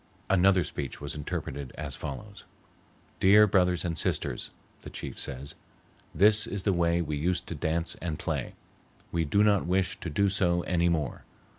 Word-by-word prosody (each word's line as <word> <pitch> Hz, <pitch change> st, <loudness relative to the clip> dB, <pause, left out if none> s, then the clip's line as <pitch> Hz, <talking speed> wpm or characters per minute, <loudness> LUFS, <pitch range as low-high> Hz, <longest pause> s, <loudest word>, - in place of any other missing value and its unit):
Another 95 Hz, -1 st, +4 dB
speech 70 Hz, -4 st, -6 dB
was 70 Hz, -1 st, -5 dB
interpreted 70 Hz, -2 st, -5 dB
as 75 Hz, -3 st, -2 dB
follows: 100 Hz, +10 st, -7 dB, 0.8 s
"'Dear 105 Hz, +3 st, +7 dB
Brothers 90 Hz, -3 st, +2 dB
and 85 Hz, -2 st, -1 dB
Sisters,' 80 Hz, -, -2 dB, 0.3 s
the -, -, -9 dB
chief -, -, -7 dB
says, 70 Hz, +1 st, -2 dB, 0.6 s
'this 105 Hz, +1 st, +5 dB
is 100 Hz, -2 st, -4 dB
else 100 Hz, -3 st, +2 dB
way 85 Hz, 0 st, +2 dB
we 75 Hz, -2 st, -3 dB
used 85 Hz, +3 st, 0 dB
to -, -, -3 dB
dance 80 Hz, +2 st, -1 dB
and 80 Hz, -3 st, -3 dB
play. 80 Hz, -7 st, -3 dB, 0.6 s
We 85 Hz, -1 st, 0 dB
do 100 Hz, +8 st, +3 dB
not 100 Hz, -4 st, +3 dB
wish 95 Hz, +1 st, 0 dB
to 85 Hz, -, -5 dB
do 100 Hz, +7 st, +2 dB
so 90 Hz, -3 st, +1 dB
any 85 Hz, -1 st, +1 dB
more. 75 Hz, -6 st, -2 dB
85 Hz, 165 wpm, -28 LUFS, 75-95 Hz, 0.8 s, Dear